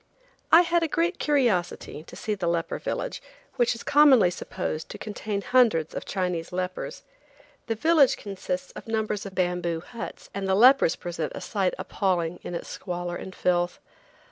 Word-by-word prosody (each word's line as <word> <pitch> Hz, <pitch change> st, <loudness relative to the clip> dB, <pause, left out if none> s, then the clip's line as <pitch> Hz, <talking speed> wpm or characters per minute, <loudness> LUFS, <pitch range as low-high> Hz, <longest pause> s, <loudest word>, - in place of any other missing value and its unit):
I 330 Hz, -, +9 dB
had 345 Hz, 0 st, +2 dB
a 330 Hz, -, +1 dB
great 335 Hz, +4 st, 0 dB
curiosity 230 Hz, -, 0 dB
to -, -, -12 dB
see 215 Hz, -, -2 dB
the 190 Hz, -4 st, -2 dB
leper 170 Hz, -1 st, -1 dB
village, -, -, -3 dB, 0.4 s
which 240 Hz, -1 st, +2 dB
is 230 Hz, -, -9 dB
commonly 275 Hz, -10 st, +6 dB
supposed 155 Hz, -2 st, -4 dB
to -, -, -7 dB
contain 205 Hz, -1 st, -4 dB
hundreds 225 Hz, -12 st, +3 dB
of -, -, -5 dB
Chinese 180 Hz, -3 st, -2 dB
lepers. 185 Hz, 0 st, -4 dB, 0.6 s
The 225 Hz, -, 0 dB
village 305 Hz, +2 st, +4 dB
consists 185 Hz, -2 st, -5 dB
of -, -, -10 dB
numbers 215 Hz, -2 st, -1 dB
of 190 Hz, -, -11 dB
bamboo 175 Hz, -2 st, 0 dB
huts, 230 Hz, +7 st, -9 dB
and 195 Hz, 0 st, -3 dB
the 190 Hz, -, +4 dB
lepers 255 Hz, -2 st, +6 dB
present 170 Hz, -3 st, -4 dB
a -, -, -6 dB
sight 195 Hz, -3 st, -1 dB
appalling 180 Hz, -4 st, -1 dB
in 175 Hz, -, -6 dB
its -, -, -5 dB
squalor 175 Hz, -1 st, -4 dB
and 190 Hz, +1 st, -8 dB
filth. 175 Hz, -1 st, 0 dB
195 Hz, 170 wpm, -26 LUFS, 175-235 Hz, 0.6 s, I